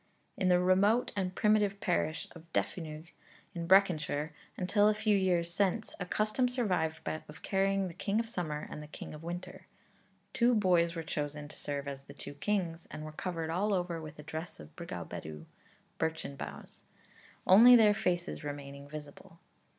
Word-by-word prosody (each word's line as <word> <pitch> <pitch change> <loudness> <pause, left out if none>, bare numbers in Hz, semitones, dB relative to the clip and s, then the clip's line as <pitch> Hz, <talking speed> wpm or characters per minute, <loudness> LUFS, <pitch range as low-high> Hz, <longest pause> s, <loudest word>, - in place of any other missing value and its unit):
In 185 - +1
the 180 0 +5
remote 195 +6 +3
and 185 -2 -2
primitive 210 -2 +3
parish 165 -3 0
of 165 -1 -14
Defynog, 160 -1 -3 0.4
in 170 -1 -4
Breconshire, 165 -5 +3 0.3
until 205 +3 +3
a 215 - +3
few 215 -1 +2
years 175 -3 +1
since, 200 +4 0
a 180 - -4
custom 215 +6 +1
survived 185 -11 0
of 155 - -6
carrying 195 0 +1
the 175 - -7
King 200 +5 0
of 230 - -1
Summer 155 -9 -3
and 150 - -6
the 150 - -9
King 150 - -8
of 150 - -9
Winter. 175 +2 -7 0.7
Two 245 -2 +4
boys 175 -5 +3
were 165 - -3
chosen 150 -1 -4
to - - -12
serve 140 -1 -4
as 140 -1 -5
the 140 0 -14
two 145 - -8
kings, 170 0 -2
and 155 0 -7
were 155 - -6
covered 165 0 -3
all 200 +4 +1
over 175 -2 -2
with 155 -1 -9
a 150 - -9
dress 160 +2 -6
of 75 0 -13
brigau - - -6
bedw, 75 0 -7 0.5
(birchen 160 -3 -2
boughs,) - - -8 0.6
only 235 +6 +9
their 215 -3 +7
faces 180 -6 -1
remaining 140 -1 -7
visible. 155 +4 -10
175 Hz, 175 wpm, -32 LUFS, 155-200 Hz, 0.7 s, only